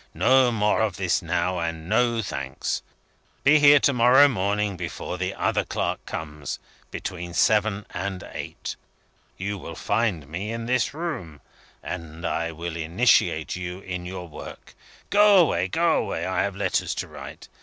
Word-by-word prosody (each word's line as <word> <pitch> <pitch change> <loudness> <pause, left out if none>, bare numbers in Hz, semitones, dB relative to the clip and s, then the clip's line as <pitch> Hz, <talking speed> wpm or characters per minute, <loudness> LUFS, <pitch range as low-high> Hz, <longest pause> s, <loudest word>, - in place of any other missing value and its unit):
"No 130 -1 +4
more 105 -1 +2
of 105 -4 0
this 90 -2 +1
now, 90 +1 -1
and 80 -1 -4
no 115 +2 +2
thanks! 70 -8 -3 0.6
Be 150 +2 +6
here 145 0 +8
to 140 - +3
morrow 125 +4 +7
morning, 105 -3 0
before 90 +1 -5
the 90 +1 -1
other - - +1
clerk - - -2
comes 75 -2 -5 0.3
between 90 -2 -6
seven 105 -1 +2
and 95 +1 -4
eight. - - -6 0.6
You 100 +1 -3
will 85 - -8
find 100 -9 0
me 90 +8 -4
in 115 0 -4
this 125 +3 0
room; 120 - -5 0.4
and 85 -1 -6
I 85 0 -1
will 85 +2 -5
myself 80 0 -4
initiate 85 -4 +2
you 90 +1 -5
in 90 -2 -5
your 90 -1 -6
work. 75 - -10 0.4
Go 205 0 +6
away! 165 - +3
go 165 - +2
away! - - -2
I 95 - 0
have 100 -1 -2
letters 100 -2 0
to - - -4
write. - - -10
95 Hz, 160 wpm, -25 LUFS, 85-115 Hz, 0.6 s, here